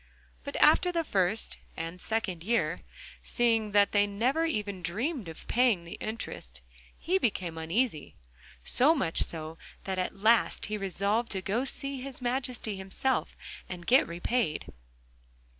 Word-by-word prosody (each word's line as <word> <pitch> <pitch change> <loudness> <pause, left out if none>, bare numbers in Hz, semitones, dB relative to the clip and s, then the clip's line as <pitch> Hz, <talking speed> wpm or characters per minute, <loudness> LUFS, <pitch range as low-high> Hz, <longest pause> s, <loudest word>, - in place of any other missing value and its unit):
But - - -6
after 360 - +5
the 335 -1 0
first 200 - 0 0.2
and 165 +2 -5
second 195 -7 -2
year, 180 -6 0 0.4
seeing 225 -3 +2
that 205 -1 +5
they 205 0 +3
never 250 +11 +1
even 210 - -2
dreamed 220 - -2
of 160 - -10
paying 235 -7 +3
the 170 - -9
interest, 65 - -6 0.4
he 370 +4 +1
became 185 - -1
uneasy, 165 - -1 0.5
so 290 - +4
much 210 - 0
so 160 0 -3 0.2
that 190 -1 -2
at 185 - -2
last 220 +3 +3
he 215 - -3
resolved 200 +4 -1
to 190 -1 -3
go 205 +5 0
and 265 - -1
see 275 -2 -4
His 270 -1 -5
Majesty 250 -3 -2
himself, 195 +7 -1 0.3
and 175 -1 -7
get 260 +3 +5
repaid. 170 - -1
210 Hz, 145 wpm, -29 LUFS, 180-250 Hz, 0.5 s, after